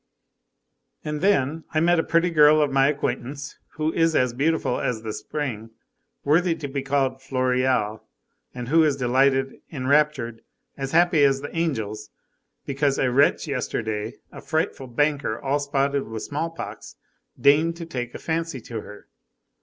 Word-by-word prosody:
51 150 - -3
And 150 - -4
then, 160 -5 +2
I - - +4
met 175 +1 +3
a - - +2
pretty 170 +1 +2
girl 150 -1 +6
of 145 -2 +2
my 135 0 +4
acquaintance, 140 -1 -3
who 155 0 -1
is 165 -1 +2
as 125 -2 +2
beautiful 145 -1 0
as 115 -3 -2
the 110 -1 -4
spring, 115 -1 -4 0.5
worthy 165 +4 +3
to 145 - -6
be 140 0 -3
called 135 -1 0
Floréal, 130 -4 0 0.5
and 125 -1 -7
who 165 +2 +5
is 145 -3 +2
delighted, 135 +1 +1
enraptured, 135 -4 +1 0.3
as 135 -1 -4
happy 170 -2 +4
as 135 -1 +3
the 145 - -7
angels, 110 -10 -2 0.6
because 140 0 0
a 130 - +1
wretch 140 +5 +3
yesterday, 110 -5 -3 0.2
a - - -10
frightful 155 -4 -2
banker 140 -2 0
all 140 0 0
spotted 140 0 0
with 110 -1 -6
small 155 +3 -3
pox, 165 - -8 0.4
deigned 155 +4 +4
to 170 0 -7
take 125 -6 -5
a - - -3
fancy 165 -3 -3
to 115 -1 -6
her! 105 0 -13
140 Hz, 160 wpm, -24 LUFS, 125-155 Hz, 0.6 s, girl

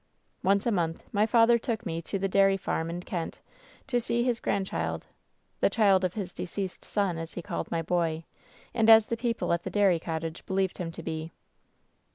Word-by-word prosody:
"Once 200 +1 +2
a 235 - +2
month 165 -5 -1
my 210 +1 +2
father 230 +1 +5
took 230 -2 -3
me 165 -1 -3
to 195 - -3
the 195 0 0
dairy 195 0 +4
farm 165 -3 -2
in 175 +1 -5
Kent 170 -3 -4 0.5
to 245 -3 0
see 235 +1 0
his 240 -2 0
grandchild 195 -1 -2 0.3
— - - -44
the - - +4
child 200 -4 +4
of 185 -1 -1
his 195 -4 -4
deceased 185 +1 -5
son,' 195 -5 -1
as 165 0 -7
he 175 - -4
called - - -4
my 165 -1 -1
boy, 165 -1 0 0.5
and 225 -1 +3
as 220 -1 +9
the 230 - 0
people 230 -5 -1
at 170 - 0
the - - -5
dairy 195 -5 +3
cottage 160 0 -4
believed 190 -1 0
him 170 -2 -3
to 165 0 -9
be. 160 0 -4
190 Hz, 205 wpm, -28 LUFS, 170-220 Hz, 0.5 s, as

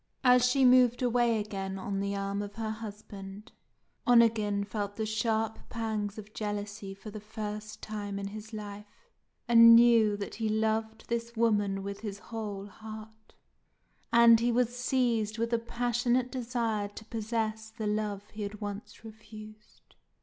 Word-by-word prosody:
As 250 -1 +6
she 260 +2 +4
moved 250 -1 +5
away 240 -2 +2
again 195 -2 -4
on 195 +1 -3
the 200 0 -2
arm 200 0 -2
of 205 0 -7
her 220 -1 -3
husband, 210 -1 -9 0.6
Onegin 220 -4 +4
felt 205 0 -4
the 220 - -2
sharp 220 0 -1
pangs 220 -3 -3
of 215 0 -10
jealousy 205 -1 -4
for 210 +2 -10
the 215 - -7
first 210 0 -7
time 205 -2 -4
in 200 0 -4
his 215 +2 -9
life, 210 - -9 0.4
and 230 0 +9
knew 230 -3 +5
that 200 - -5
he 220 - +1
now 215 - 0 0.2
loved 220 0 -5
this 235 0 -3
woman 205 -4 +1
with 200 0 -5
his 205 -2 -5
whole 205 -3 -6
heart; 220 +1 -11 0.8
and 235 -1 +7
he 240 +1 +2
was 245 0 +1
seized 240 -4 0
with 230 +1 -1
a 235 - +3
passionate 240 +1 0
desire 230 -5 -1
to 205 +2 -11
possess 220 -1 -3
the 220 -1 -6
love 210 -1 -2
he 215 - -8
had 205 0 -5
once 205 +2 -7
refused. 215 -1 -13
215 Hz, 155 wpm, -30 LUFS, 205-230 Hz, 0.8 s, and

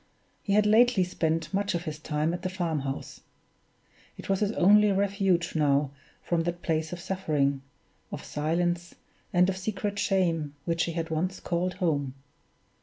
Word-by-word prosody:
He 200 - -1
had 210 0 +4
lately 220 -1 +5
spent 165 -1 -1
much 200 -1 0
of 170 - -2
his 155 -3 -5
time 155 +2 -1
at 175 - -4
the 185 - -2
farm 175 -5 -1
house; 135 0 -5 1.0
it - - -9
was 195 -1 +2
his 210 -1 +1
only 210 +2 +5
refuge 195 -3 +1
now 145 -2 +2 0.3
from 170 -1 0
that 175 +1 -3
place 160 -1 -1
of 180 - -5
suffering, 150 -7 0 0.5
of - - -6
silence, 175 +3 -1 0.4
and 180 0 +4
of 190 -1 -1
secret 200 +1 -3
shame, 165 -8 +1
which 165 -1 +1
he 170 - -4
had 165 0 -3
once 180 +4 -1
called 180 +1 -1
home! 145 -7 -1
175 Hz, 165 wpm, -28 LUFS, 160-190 Hz, 1.0 s, lately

